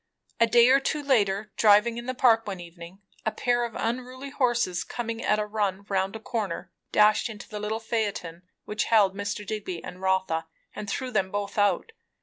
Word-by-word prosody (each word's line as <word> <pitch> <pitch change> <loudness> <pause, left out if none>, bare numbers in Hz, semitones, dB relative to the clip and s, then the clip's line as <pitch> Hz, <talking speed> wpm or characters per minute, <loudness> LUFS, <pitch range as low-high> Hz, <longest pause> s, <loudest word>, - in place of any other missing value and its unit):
A 230 - +5
day 235 +1 +6
or 270 +1 +6
two 295 +2 -2
later, 210 -6 +1
driving 220 +2 +5
in 240 - -8
the 255 - -2
Park 225 -3 +4
one 195 -3 -4
evening, 175 +3 -11 0.2
a 220 - 0
pair 240 +1 +1
of 235 -2 -4
unruly 255 +3 -4
horses 240 -10 +1
coming 230 -1 -5
at 210 - +2
a 210 - -1
run 200 -2 -2
round 195 +1 0
a - - -5
corner 220 -5 -4 0.2
dashed 210 +2 +4
into 220 +1 -9
the 210 - -6
little 215 +2 -2
phaeton 205 -7 -3 0.2
which 210 - -1
held 205 -4 +4
Mr. 205 +1 -4
Digby 195 -5 -4
and 180 - -9
Rotha, 190 -4 0 0.3
and 210 -1 -6
threw 255 +4 -3
them 195 -4 +1
both 200 0 -3
out. 205 - +1
210 Hz, 190 wpm, -26 LUFS, 195-235 Hz, 0.3 s, day